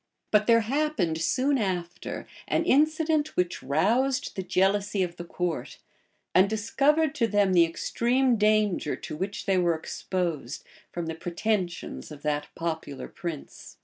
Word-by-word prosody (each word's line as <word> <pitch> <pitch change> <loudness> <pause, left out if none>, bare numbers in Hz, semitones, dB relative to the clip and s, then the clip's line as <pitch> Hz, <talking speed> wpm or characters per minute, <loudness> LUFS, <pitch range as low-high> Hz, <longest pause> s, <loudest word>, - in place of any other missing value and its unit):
But 210 0 +4
there 230 -1 +6
happened, 225 - 0
soon 260 - +2
after, 180 -4 -3 0.2
an - - +1
incident 310 +1 +2
which 180 -1 0
roused 235 - +1
the 190 - -2
jealousy 195 +2 +1
of 175 -1 -5
the 175 - -6
court, 175 -1 -3 0.6
and 190 +2 +5
discovered 275 +8 +2
to 250 -7 +1
them 205 -2 +2
the 170 -2 +6
extreme 240 +9 +1
danger 210 -7 +2
to - - -7
which 190 +5 -4
they 190 -1 +2
were 170 -2 +2
exposed 160 -4 -3 0.3
from 175 -1 -4
the 165 - -3
pretensions 175 +2 -3
of 150 -2 -11
that 150 -1 -1
popular 160 -4 -4
prince. 170 -5 -8
190 Hz, 145 wpm, -27 LUFS, 170-235 Hz, 0.6 s, there